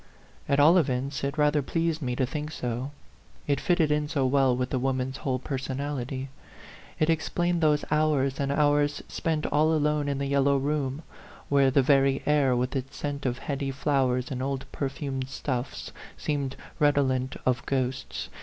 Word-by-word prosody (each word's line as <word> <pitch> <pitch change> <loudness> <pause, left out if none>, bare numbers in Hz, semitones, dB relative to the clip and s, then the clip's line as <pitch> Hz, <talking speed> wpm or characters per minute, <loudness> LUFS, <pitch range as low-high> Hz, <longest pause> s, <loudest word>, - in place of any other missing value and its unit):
At 140 - +3
all 165 +6 +7
events, 135 -1 -1
it 140 +2 -2
rather 150 0 +3
pleased 165 +3 -1
me 125 -3 -2
to 130 - +1
think 150 +4 -5
so; 125 -1 -3 0.6
it 140 -2 +1
fitted 160 +1 +2
in 150 0 +1
so 140 -3 0
well 130 -1 +3
with 125 0 -2
the 130 - 0
wom 130 0 0
an's 130 +1 -3
whole 130 -2 -1
personality; 135 0 -4 0.7
it 155 - +2
explained 170 +2 0
those 150 -2 +3
hours 150 -3 +2
and 140 0 0
hours 145 0 +2
spent 160 -2 -2
all 155 +2 +3
alone 150 -1 +1
in 140 - -1
the 140 - -2
yel 140 0 +2
low 140 0 +3
room, 140 +1 -1 0.5
where 140 -1 +4
the 135 +1 +3
very 135 -1 +3
air, 145 -4 +3
with 125 +2 -1
its 135 0 -4
scent 145 -2 -3
of 125 0 -1
heady 140 0 -3
flowers 130 -2 0
and 130 -1 -3
old 135 0 -2
perfumed 135 -1 -3
stuffs, 130 -2 -4 0.3
seemed 140 -3 -2 0.2
redolent 135 -3 +2
of 125 -2 +1
ghosts. 130 -1 -2
140 Hz, 175 wpm, -27 LUFS, 130-150 Hz, 0.7 s, all